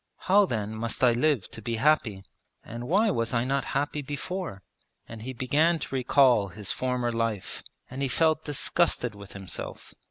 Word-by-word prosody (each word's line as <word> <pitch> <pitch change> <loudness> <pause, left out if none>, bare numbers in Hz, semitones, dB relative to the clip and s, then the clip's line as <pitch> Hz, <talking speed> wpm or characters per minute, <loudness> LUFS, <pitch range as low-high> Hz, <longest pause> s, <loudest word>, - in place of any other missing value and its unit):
How 200 +1 +4
then 110 - -2
must 115 +3 -3
I 125 - +7
live 125 -2 +1
to 115 - -7
be 115 +2 -2
happy, 115 -6 +2 0.4
and 120 +2 -7
why 205 - +3
was 115 -5 -1
I 115 - +2
not 135 +2 0
happy 145 +1 -1
before?' 145 - -5 0.4
And 115 -1 -9
he 130 +4 -5
began 145 +7 +2
to 140 - -7
recall 130 -4 +4
his 100 +1 -5
former 125 -2 -1
life 115 -4 -2 0.3
and 130 +2 -7
he 140 - +1
felt 155 +3 +2
disgusted 145 -4 +1
with 100 -1 -11
himself. 95 -2 -6
125 Hz, 170 wpm, -27 LUFS, 115-150 Hz, 0.4 s, I